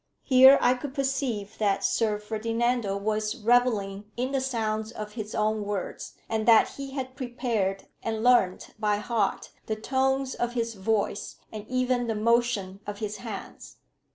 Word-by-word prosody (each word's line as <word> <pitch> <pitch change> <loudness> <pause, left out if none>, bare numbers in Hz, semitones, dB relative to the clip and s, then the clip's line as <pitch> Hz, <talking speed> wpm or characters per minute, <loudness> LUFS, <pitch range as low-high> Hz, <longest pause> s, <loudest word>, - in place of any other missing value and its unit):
Here 265 +1 +8
I 245 - +5
could 260 +2 -6
perceive 265 -7 -2
that 200 -2 +1
Sir 215 -2 +1
Ferdinando 225 0 -1
was 215 +2 -1
revelling 220 -4 +1
in 255 +2 -1
the 270 -1 0
sounds 220 -4 -2
of 215 -2 -7
his 215 -1 -6
own 215 0 +1
words, 205 -2 -5
and 220 0 -2
that 230 -2 +7
he 275 -1 -8
had 260 -2 -5
prepared 235 -7 -2 0.2
and 220 -1 -3
learnt 240 -7 +3
by 210 -1 +1
heart 210 -2 -1 0.2
the 220 - -1
tones 265 +3 0
of 240 0 -2
his 230 -1 -1
voice, 205 0 -1 0.2
and 215 -1 -8
even 255 -1 0
the 225 - -1
motion 215 -3 +1
of 205 0 -4
his 210 0 -4
hands. 220 -5 -8
225 Hz, 155 wpm, -27 LUFS, 210-250 Hz, 0.2 s, Here